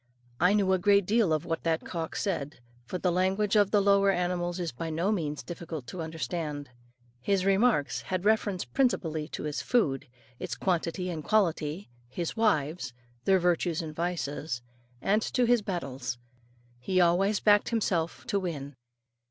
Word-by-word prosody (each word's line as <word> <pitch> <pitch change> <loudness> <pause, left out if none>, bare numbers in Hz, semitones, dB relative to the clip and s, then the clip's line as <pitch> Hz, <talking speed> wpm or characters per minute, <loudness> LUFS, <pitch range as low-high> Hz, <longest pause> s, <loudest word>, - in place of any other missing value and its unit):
I 180 +4 +4
knew 195 -2 +3
a 185 - +2
great 200 +1 +4
deal 215 -3 +3
of 155 -1 0
what 165 - -2
that 165 -1 0
cock 165 -2 -4
said, 160 - -2 0.3
for 185 - -3
the 180 0 +1
language 190 +4 +1
of 205 -2 +5
the 205 -1 +3
lower 200 0 +4
animals 175 -1 0
is 170 -3 -2
by 165 +7 -5
no 170 +6 0
means 150 -8 -2
difficult 165 -5 -6
to 180 - -5
understand. 160 -3 -4 0.5
His 190 +6 +1
remarks 195 -6 +2
had 185 0 -3
reference 205 - +2
principally 160 - 0
to - - -6
his 150 -1 -2
food, 145 - +1 0.3
its - - -4
quantity 180 0 -1
and 160 -3 -5
quality, 170 - 0 0.2
his 165 +6 -4
wives 155 - +1 0.3
their 190 -1 +5
virtues 175 -2 +1
and 155 -1 -7
vices, 155 -6 -3 0.4
and 210 +2 +3
to 245 +2 +1
his 240 -1 +4
battles. 135 -10 -4 0.6
He 185 +10 0
always 185 +4 +3
backed 205 -1 +4
himself 180 -8 -1
to 200 - 0
win. 145 -6 -4
175 Hz, 160 wpm, -29 LUFS, 155-200 Hz, 0.6 s, of